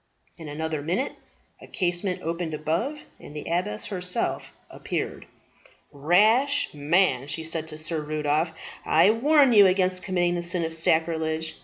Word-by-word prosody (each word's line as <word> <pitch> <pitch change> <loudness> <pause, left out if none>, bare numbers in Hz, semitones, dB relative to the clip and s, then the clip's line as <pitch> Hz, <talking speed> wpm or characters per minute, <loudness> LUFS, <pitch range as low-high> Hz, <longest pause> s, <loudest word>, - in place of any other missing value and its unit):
In 160 -2 -8
another 155 0 -3
minute 180 - -2 0.5
a - - -12
casement 180 -1 -2
opened 165 -1 -3
above, 170 - -2 0.2
and 150 - -12
the 150 - -5
abbess 195 +6 -2
herself 180 -3 -2 0.2
appeared. - - -5 0.6
"Rash 215 - +3
man," 145 -2 +1
she 145 +3 -3
said 160 0 -4
to 155 - -7
Sir 155 0 -3
Rudolph, 150 +2 -1 0.3
"I 165 +6 +4
warn 275 +3 +4
you 205 -3 +8
against 185 0 +1
committing 175 -2 0
the 175 - -2
sin 170 0 -2
of 160 - -5
sacrilege. 160 0 0
170 Hz, 145 wpm, -25 LUFS, 155-190 Hz, 0.6 s, you